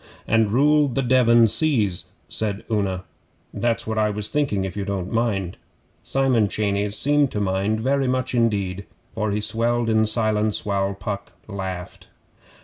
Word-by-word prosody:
'"And 110 -1 +3
ruled 145 +3 +3
the 135 - +1
Devon 120 -2 +5
seas,"' 110 - +2 0.4
Una 105 -2 -2
went 105 -2 +1
on. 95 -1 -4 0.5
'That's 115 -1 -1
what 110 0 -2
I 105 0 +2
was 105 0 -3
thinking 135 -10 0
if 95 - -6
you 100 - -3
don't 95 -2 -4
mind.' 105 -6 -1 0.4
Simon 130 -6 +1
Cheyneys 100 0 -1
seemed 145 -1 +2
to 105 - -3
mind 100 +2 0
very 135 +2 +1
much 130 0 -1
indeed, 100 -5 0 0.3
for 105 +1 -1
he 105 +1 -1
swelled 115 +2 +1
in 110 0 +3
silence 110 -1 +1
while 100 -1 -1
Puck 100 -1 -6
laughed. 95 -3 -6
110 Hz, 155 wpm, -22 LUFS, 100-120 Hz, 0.5 s, Devon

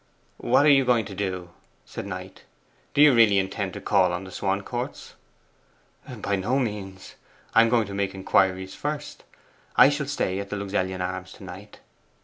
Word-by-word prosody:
'What 130 +4 +3
are 150 - +7
you 135 -1 +5
going 120 -4 +2
to 100 - -8
do?' 95 -3 -4 0.3
said - - -7
Knight. - - -8 0.5
'Do 145 - +6
you 150 -2 +7
really 115 -4 +5
intend 95 0 -2
to - - -6
call 95 -3 +3
on 90 +2 -3
the 95 - -10
Swancourts?' 100 +8 -4 1.0
'By 100 - -2
no 110 +8 0
means. 100 -6 -4 0.4
I 115 - +7
am 115 - +3
going 115 -2 +2
to 100 - -8
make 100 -1 -2
inquiries 95 0 +1
first. 150 0 -5 0.5
I 135 - +8
shall 145 -1 -2
stay 100 -9 -1
at 100 0 -6
the 105 - -3
Luxellian 95 -2 -2
Arms 95 +1 -4
to - - -14
night. 95 +3 -11
100 Hz, 175 wpm, -25 LUFS, 95-120 Hz, 1.0 s, I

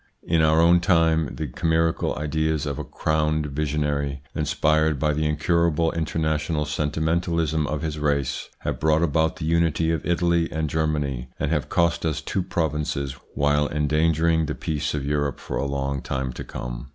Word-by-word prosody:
In 80 -1 +2
our 80 0 +4
own 85 +1 +6
time, 80 -4 +2
the 80 - -3
chimerical 80 +3 0
ideas 80 +1 -1
of 70 -2 -3
a - - -3
crowned 75 -1 0
visionary, 70 -1 -2
inspired 75 0 +1
by 75 +2 +1
the 75 +1 0
incurable 80 +1 +1
international 80 -1 -1
sentimentalism 80 +1 0
of 75 +1 -3
his 80 -1 -3
race, 70 -3 -1
have - - -3
brought 80 +1 +3
about 80 +2 +1
the 80 - -5
unity 80 0 +2
of 80 -3 -1
Italy 85 -1 +1
and 80 -1 -2
Germany, 75 -5 -1
and - - -1
have - - -1
cost 85 -1 +1
us 80 -2 0
two 95 - -2
provinces, 75 -5 -2 0.2
while 75 +1 +2
endangering 80 +2 +2
the - - -3
peace 75 -1 -2
of 70 -2 -3
Europe 70 -2 -1
for - - -4
a 70 - -1
long 70 0 -2
time 65 -2 -3
to - - -6
come. - - -6
75 Hz, 165 wpm, -24 LUFS, 75-80 Hz, 0.2 s, own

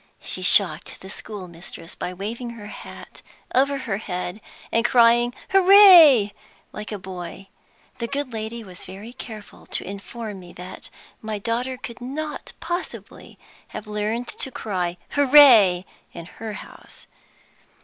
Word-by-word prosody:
She - - -5
shocked - - +3
the 190 - -9
schoolmistress 175 -5 -9
by 180 - -5
waving 220 +6 -5
her 210 - -10
hat 210 - -11 0.3
over 275 +2 +2
her 240 -7 -3
head 180 0 -5 0.3
and 230 - +2
crying 240 0 +4 0.2
'Hooray,' 360 - +8 0.4
like 210 +1 -7
a 210 - -3
boy. 185 0 -9 0.5
The 235 - -2
good 275 -1 -4
lady 225 +1 -5
was 185 -3 -11
very 200 +6 -10
careful 220 -5 -11
to - - -2
inform 200 +1 -7
me 175 -1 -13
that 180 +1 -10 0.3
my 215 -1 -4
daughter 240 +5 -2
could 245 -1 -9
not 300 +5 -5
possibly 345 +2 -6 0.3
have 215 - -8
learned 210 +3 -3
to - - -4
cry 180 -8 -3
'Hooray' 255 -11 +7 0.3
in 170 - -8
her 215 +4 -8
house. - - -12
220 Hz, 135 wpm, -23 LUFS, 195-255 Hz, 0.5 s, Hooray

